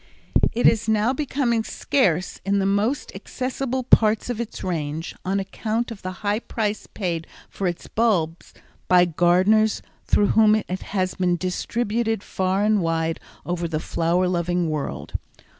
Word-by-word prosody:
It 240 - 0
is 225 0 +4
now 220 +3 +2
becoming 260 -5 0
scarce 190 - 0
in 200 +1 +1
the 195 - +1
most 205 +7 0
accessible 260 0 -3
parts 220 0 +4
of 235 -1 -3
its 235 - -6
range 160 -2 -3
on 195 +2 0
account 220 +4 -2
of 215 - -8
the 185 - -4
high 205 +1 +2
price 215 -3 -3
paid 170 -5 -3 0.2
for 195 - -2
its 175 -1 -4
bulbs 180 -8 0 0.4
by 180 -1 +6
gardeners 185 +6 +3 0.2
through 205 - +3
whom 215 -1 +5
it 215 - -2
has 185 -2 -1
been 180 -1 +1
distributed 225 +4 -1
far 190 +1 0
and 210 -1 +3
wide 165 -1 0 0.3
over 175 -1 -2
the 155 -2 -2
flower 170 +3 +1
loving 175 -1 0
world. 150 -2 -4
195 Hz, 150 wpm, -23 LUFS, 175-225 Hz, 0.4 s, by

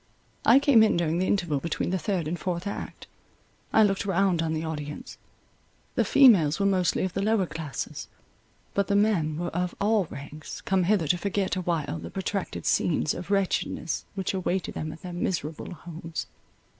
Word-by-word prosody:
I 235 - +8
came 275 -5 +6
in 220 -5 +4
during 170 0 +1
the 185 - +1
interval 175 -8 +1
between 170 +3 -2
the 190 - 0
third 185 -7 -1
and 170 +2 -3
fourth 180 -1 -3
act. 200 - -6 0.7
I 220 - +6
looked 195 -2 +1
round 195 -3 +2
on 165 -1 -1
the 155 - -2
audience; 150 -2 -6 0.7
the - - +2
females 200 - +6
were 200 - +2
mostly 185 -3 +2
of 185 -1 -2
the 195 - -1
lower 210 -1 +2
classes, 155 -6 -5 0.7
but 200 -1 +1
the 200 - +1
men 190 -8 +2
were 175 +1 -2
of 180 +1 -2
all 210 -1 +2
ranks, 145 +1 -8
come 190 -2 +1
hither 190 -4 +2
to 175 - +2
forget 200 0 -1
awhile 170 -5 -2
the - - -7
protracted 195 0 -3
scenes 155 -2 +2
of 180 - -7
wretchedness, 195 -5 -1
which 190 -1 -2
awaited 185 -1 -1
them 155 0 -4
at 160 - -12
their 180 -1 -6
miserable 170 -3 -3
homes. 165 +1 -6
180 Hz, 180 wpm, -27 LUFS, 160-200 Hz, 0.7 s, I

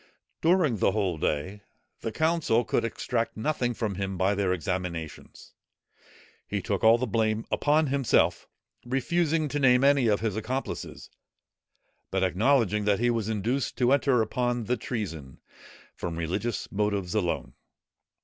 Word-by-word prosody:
During 165 - +3
the 95 - +2
whole 95 -6 -1
day, 85 +8 -2 0.4
the 115 - -4
council 155 -4 +1
could - - 0
extract 115 0 -2
nothing 120 -1 -1
from 110 -3 -2
him 95 0 -4
by 95 +2 +2
their 100 -2 0
examinations. 90 -3 -5 0.9
He - - -2
took - - -2
all 110 +1 +7
the 125 - -1
blame 110 0 0
upon 150 +2 +2
himself, 135 -3 +1 0.4
refusing 155 +5 0
to 145 - -2
name 125 -1 +4
any 140 -3 +4
of 105 -2 +2
his 110 -3 -1
accomplices, 125 +5 -5 1.0
but 95 0 0
acknowledging 105 - +2
that 105 -1 +3
he 120 +1 +2
was 115 -2 -2
induced 115 +6 -1
to 125 0 +3
enter 135 -4 +3
upon 120 +2 -1
the 125 +4 0
treason, 95 - -5 0.5
from 85 -1 -5
religious 90 +7 -3
motives 100 -3 -1
alone. 90 -6 -1
110 Hz, 140 wpm, -27 LUFS, 100-130 Hz, 1.0 s, all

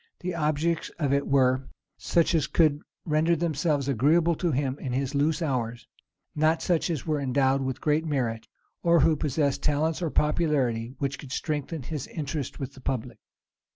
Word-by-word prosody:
The 180 0 -3
objects 160 +1 0
of 145 -4 0
it 140 0 +1
were 130 -1 +2 0.3
such 170 +1 +1
as 155 -5 +2
could 155 -3 +3 0.2
render 160 +2 +2
themselves 155 -3 0
agreeable 155 +7 +3
to 175 - 0
him 135 -1 -1
in 130 -3 -4
his 135 +2 -1
loose 150 +4 +1
hours; 120 -5 -2 0.5
not 155 +2 +2
such 175 -1 +1
as 160 -5 -2
were 155 -2 0
endowed 135 0 +2
with 130 -1 -3
great 150 +1 +1
merit, 120 -6 -2 0.3
or 170 -1 +4
who 160 - +4
possessed 145 -1 0
talents 155 +3 0
or 170 - 0
popularity 135 -7 0
which 140 0 -2
could 140 - -10
strengthen 150 +1 -3
his 150 0 -5
interest 145 -3 -4
with 135 -1 -5
the 130 - -14
public. 125 -3 -3
145 Hz, 170 wpm, -27 LUFS, 135-160 Hz, 0.5 s, or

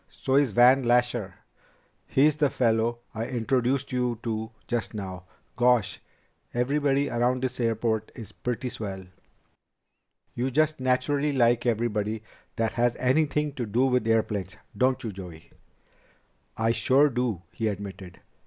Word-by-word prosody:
"So's 135 0 +1
Van 125 +5 +5
Lasher 120 -5 +1 0.7
he's 145 +2 +3
the 150 -2 +3
fellow 115 -1 +1
I 115 0 -3
introduced 125 +2 0
you 125 -2 0
to 110 -1 -3 0.2
just 120 -2 -2
now. 95 -3 -6 0.3
Gosh! 120 -5 +2 0.6
Everybody 140 +2 +1
around 125 +2 0
this 130 -1 -3
airport 110 -2 0
is 110 -5 -9
pretty 125 +2 -3
swell." 95 -5 -6 1.3
"You 125 +2 -1
just 155 +3 +1
naturally 140 +3 +1
like 120 -2 +3
everybody 110 -2 -1 0.3
that 115 -1 0
has 120 +1 +1
anything 150 +3 +1
to 120 -4 -4
do 120 +6 +2
with 125 -3 +1
airplanes, 105 -3 0 0.2
don't 130 +1 +1
you, 110 - -3
Joey?" 85 -4 -11 1.1
"I 115 0 +2
sure 130 +5 +4
do," 120 - -2
he 110 - -2
admitted. 95 -3 -6
120 Hz, 130 wpm, -26 LUFS, 110-130 Hz, 1.3 s, Van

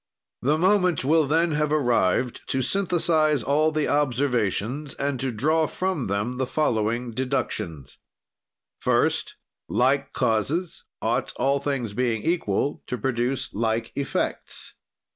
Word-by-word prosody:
"The 145 +5 +2
moment 180 -4 +2
will 155 +1 +4
then 165 +3 +2
have 150 0 0
arrived 120 -5 +1
to 130 0 0
synthesize 160 - +2
all 150 +6 +2
the 155 -1 0
observations 130 -1 0
and 140 -2 -2
to 130 0 -1
draw 155 +8 +2
from 185 -6 -2
them 105 +6 -2
the 130 - 0
following 120 -4 0
deductions: 115 - -3 0.8
"First, - - +1 0.3
like - - +2
causes 150 - -1 0.2
ought, - - 0
all 140 +1 +1
things 135 -6 -2
being 115 -1 0
equal, 145 - 0
to 125 - -3
produce 125 +2 -1
like 115 +1 -1
effects. 140 -1 -3
135 Hz, 125 wpm, -25 LUFS, 120-155 Hz, 0.8 s, will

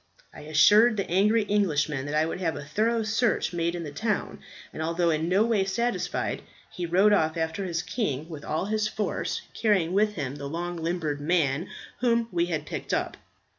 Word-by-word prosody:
I - - -11
assured 210 +10 +5
the 195 - -1
angry 210 +5 +3
Englishman 155 -9 0
that 145 - -3
I 155 +1 +3
would 165 - -4
have 165 -3 0
a 145 - -7
thorough 225 +9 0
search 220 -2 0
made 170 0 -1
in 170 - -4
the 150 - -6
town; 210 +7 -2 0.3
and - - -6
although 170 +1 +1
in 160 +2 -1
no 195 +4 +4
way 225 -4 +2
satisfied, 235 +5 -2 0.3
he 175 -1 -4
rode 195 +5 +4
off 160 -4 +2
after 160 +4 -2
his 170 -2 -2
king 155 - -2
with 155 -3 -8
all 160 +4 -2
his 215 +1 0
force, 215 0 -3
carrying 190 -6 +1
with 210 +1 +2
him 140 -3 -4
the 140 -1 -6
long 175 +3 -4
limbed 165 -3 -2
man 155 0 +1 0.3
whom 235 -1 +1
we 170 0 +1
had 155 -3 -2
picked - - -3
up. - - -2
175 Hz, 195 wpm, -27 LUFS, 155-210 Hz, 0.3 s, assured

